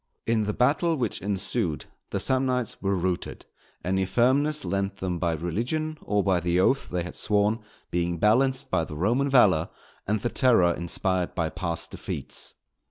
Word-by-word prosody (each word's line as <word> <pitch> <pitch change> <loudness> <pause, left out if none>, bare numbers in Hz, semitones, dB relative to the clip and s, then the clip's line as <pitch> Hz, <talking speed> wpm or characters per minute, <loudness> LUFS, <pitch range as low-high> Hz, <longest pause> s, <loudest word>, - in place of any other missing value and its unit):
In 110 -2 +1
the 105 - 0
battle 155 +8 +2
which 120 -7 -2
ensued, 100 -3 -2 0.2
the - - -2
Samnites 130 -3 0
were 100 0 +1
routed, 90 -1 -3 0.4
any 95 +1 +1
firmness 130 +7 +2
lent 100 +2 -2
them 90 -2 -3
by 85 -1 +1
religion 120 - -2
or 105 -1 0
by 95 -2 +2
the 85 +1 +1
oath 130 +9 +2
they 90 -1 -2
had 90 - -7
sworn, 105 +1 +1 0.3
being 85 0 0
balanced 130 +8 +2
by 85 - +2
the 75 - -7
Roman 120 - +1
valour, 100 -11 +4 0.4
and 105 +1 +1
the 120 - -1
terror 110 -11 +4
inspired 90 +1 -2
by 85 -3 0
past 85 -2 -3
defeats. - - -6
100 Hz, 165 wpm, -26 LUFS, 90-125 Hz, 0.4 s, valour